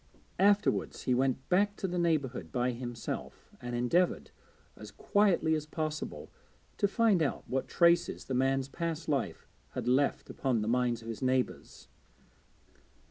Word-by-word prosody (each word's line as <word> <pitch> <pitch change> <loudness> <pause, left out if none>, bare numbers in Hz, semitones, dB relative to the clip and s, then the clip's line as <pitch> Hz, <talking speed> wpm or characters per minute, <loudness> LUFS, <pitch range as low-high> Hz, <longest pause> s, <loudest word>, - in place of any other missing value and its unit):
Afterwards 205 +1 +2
he 125 - +1
went 130 +1 0
back 205 +3 +2
to 190 - -3
the 180 0 -2
neighbourhood 140 - 0
by 125 0 0
himself, 120 -1 -6
and 120 0 -4
endeavoured, 125 +10 +1 0.4
as - - -10
quietly 195 -6 +2
as 155 -1 -2
possible, 155 0 -4 0.5
to 205 - +2
find 210 -3 +3
out 150 - -1
what 135 +1 -2
traces 170 0 +2
the 135 - -4
man's 135 +1 +1
past 165 +2 -4
life 140 -5 -2 0.3
had - - -4
left 135 +3 +1
upon 125 -5 0
the - - -3
minds 120 -1 +1
of - - -10
his 115 +1 -6
neighbours. 130 -1 -1
135 Hz, 145 wpm, -31 LUFS, 125-170 Hz, 0.5 s, find